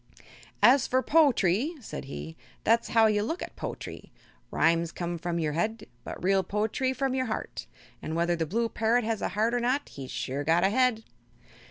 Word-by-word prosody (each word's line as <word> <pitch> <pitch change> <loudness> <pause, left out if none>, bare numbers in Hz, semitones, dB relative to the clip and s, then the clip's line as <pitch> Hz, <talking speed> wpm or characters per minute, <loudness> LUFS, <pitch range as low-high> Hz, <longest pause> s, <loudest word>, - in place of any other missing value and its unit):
"As 255 +2 +6
fer 260 +1 +1
po'try," 280 - +3
said 220 - -7
he, 160 +4 -7 0.3
"that's 230 +1 +2
as - - -7
how 225 -1 +7
you 210 -1 +3
look 325 +12 -3
at - - -9
po'try. - - -7 0.4
Rhymes 165 0 +2
come 175 -1 -4
from 175 0 -2
your 155 -3 -1
head, 220 +8 -2 0.2
but - - -8
real 195 +1 +3
po'try 215 +7 -1
from 265 0 -1
your 260 -1 0
heart, 220 - -5 0.3
an' 160 - -4
whether 170 +1 +1
the 165 -1 -2
blue 230 +7 0
parrot 225 +2 +1
has 220 -1 -2
a - - -1
heart 225 +3 +2
or 245 - +2
not 255 +4 0
he's 135 -2 -9
sure 140 +3 -3
got 165 +3 +3
a 195 - +3
head." 250 -2 +2
220 Hz, 195 wpm, -28 LUFS, 170-245 Hz, 0.4 s, how